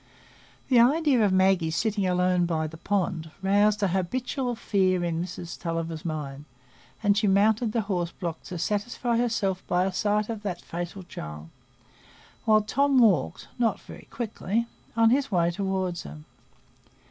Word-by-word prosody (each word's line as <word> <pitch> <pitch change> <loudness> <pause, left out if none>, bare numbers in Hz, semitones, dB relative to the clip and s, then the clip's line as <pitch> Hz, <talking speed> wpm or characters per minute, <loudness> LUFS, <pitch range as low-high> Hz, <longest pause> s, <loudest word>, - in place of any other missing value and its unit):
The 250 -3 +6
idea 270 0 +4
of 200 - +3
Maggie 185 -3 +3
sitting 200 +3 0
alone 180 -1 +2
by 160 -2 -1
the 155 +1 -7
pond 175 -3 -1
roused 205 +2 +3
an 195 - +3
habitual 245 - -2
fear 185 -5 +1
in 170 -1 -1
Mrs 175 -1 -7
Tulliver's 165 -1 -3
mind, 150 -3 -5 0.6
and 205 0 +4
she 205 0 +2
mounted 215 +3 +3
the 230 - 0
horse 180 -5 -2
block 170 -2 -5
to 180 - -6
satisfy 215 +6 -1
herself 205 -6 0
by 180 +1 +2
a 190 - -2
sight 210 +2 +1
of 225 -2 -5
that 190 -4 -4
fatal 175 +3 -6
child, 75 - -8 1.0
while 215 -1 +5
Tom 275 +5 +2
walked—not 225 0 +2
very - - -12
quickly—on 230 0 -1
his 275 -1 +1
way 170 -2 +2
toward 190 -1 -2
her. 75 +1 -8
195 Hz, 145 wpm, -26 LUFS, 175-220 Hz, 1.0 s, The